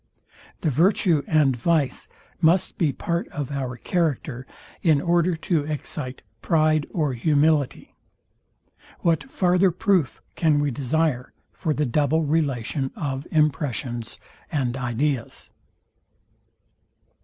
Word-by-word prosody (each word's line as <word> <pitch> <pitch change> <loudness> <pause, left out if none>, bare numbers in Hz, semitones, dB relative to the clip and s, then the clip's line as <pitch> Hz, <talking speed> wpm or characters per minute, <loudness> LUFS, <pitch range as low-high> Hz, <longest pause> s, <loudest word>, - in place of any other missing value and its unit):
The 160 - +1
virtue 170 - +3
and 150 -5 +3
vice 150 +2 0 0.3
must 170 +2 +3
be 155 -5 +2
part 170 +5 -2
of 145 -2 -5
our 130 -3 -3
character 145 -6 -2 0.3
in 155 -4 +4
order 175 +2 +2
to 160 -1 0
excite 135 -4 -5 0.2
pride 155 -2 +2
or 150 -6 -1
humility. 145 +2 +1 1.1
What 165 - +1
farther 180 -3 +3
proof 180 -5 +1 0.2
can 155 -3 +2
we 145 -1 0
desire 140 0 -1 0.2
for 155 -4 -2
the 150 - +1
double 150 +5 +1
relation 140 -3 0
of 135 -3 -4
impressions 140 -6 0 0.3
and 130 -5 -1
ideas? 130 0 -2
150 Hz, 110 wpm, -24 LUFS, 135-165 Hz, 1.1 s, in